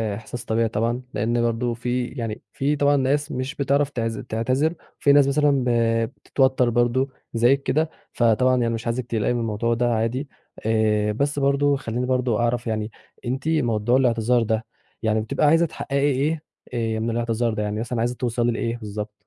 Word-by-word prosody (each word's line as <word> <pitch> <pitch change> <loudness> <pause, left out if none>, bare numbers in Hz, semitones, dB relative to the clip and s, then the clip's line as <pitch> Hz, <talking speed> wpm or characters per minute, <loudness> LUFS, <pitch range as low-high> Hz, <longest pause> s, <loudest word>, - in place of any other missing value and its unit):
إحساس 115 +2 -7
طبيعي 115 +1 +1
طبعًا، 115 +3 -1
لأن 120 +3 0
برضه 120 +1 0
في 125 +1 -2
يعني 115 -5 -5
في 145 +2 0
طبعًا 145 0 +3
ناس 145 +3 0
مش 130 +2 -3
بتعرف 140 +1 +1
تعز 115 -4 -3
تعتذر 130 +8 0 0.3
في 140 - +4
ناس 140 -1 +6
مثلًا 145 +1 +3
ب 125 - 0 0.5
بتتوتر 130 -2 +2
برضه 120 +3 +1 0.2
زيك 125 +4 +3
كده، 155 +3 +1 0.2
فطبعًا 125 +2 +3
يعني 115 0 +1
مش 115 0 -5
عايزِك 120 +1 -1
تقلقي 115 +1 0
من 120 - -1
الموضوع 115 +1 0
ده 120 0 +1
عادي. 115 +6 -1 0.4
آآ، 105 -1 +2
بس 140 +5 -1
برضه 140 +1 +2
خليني 125 -1 -3
برضه 125 -3 +1
أعرف 120 0 0
يعني 110 0 -2 0.3
أنتِ 130 +4 -3
موضوع 120 -6 +2
الإعتذار 120 -2 +2
ده 110 0 -1 0.4
يعني 110 0 +2
بتبقي 110 +6 +1
عايزة 165 +3 +5
تحققي 140 -3 -4
إيه 150 +4 0 0.3
آآ 115 -2 -1
من 115 +1 -1
الإعتذار 115 0 0
ده، 105 - -2
يعني 105 +1 -2
مثلًا 120 0 -3
عايزة 120 +2 0
توصلي 120 -1 0
لإيه 115 +1 -2
بالضبط؟ 105 -1 -6
120 Hz, 180 wpm, -23 LUFS, 115-135 Hz, 0.5 s, ناس